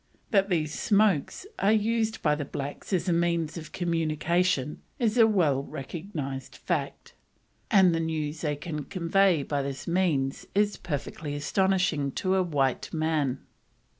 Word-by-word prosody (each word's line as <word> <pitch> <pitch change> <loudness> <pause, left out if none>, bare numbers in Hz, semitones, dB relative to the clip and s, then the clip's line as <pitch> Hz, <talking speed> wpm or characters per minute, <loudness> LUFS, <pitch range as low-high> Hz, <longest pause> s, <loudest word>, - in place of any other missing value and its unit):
That 195 -1 +3
these 155 -4 0
"smokes" 205 - +2
are 200 - +3
used 220 0 +1
by 150 - +4
the 150 0 -2
blacks 140 +4 -6
as 185 -1 0
a 175 - +3
means 170 -2 0
of 160 -3 -8
communication 165 -2 0 0.2
is 230 -4 +1
a 230 -2 +6
well 160 -11 +2
recognised 140 -1 -6
fact, - - -3 0.6
and 190 -6 +5
the 165 - 0
news 155 -1 -2
they 150 -2 0
can 150 -1 -5
convey 180 -2 +2
by 145 0 -1
this 135 0 -5
means 165 -7 0
is 205 0 +2
perfectly 150 -2 -5
astonishing 180 -2 +1
to 185 0 0
a 190 - +3
white 140 -7 0
man. 155 -5 -1
165 Hz, 145 wpm, -27 LUFS, 145-190 Hz, 0.6 s, a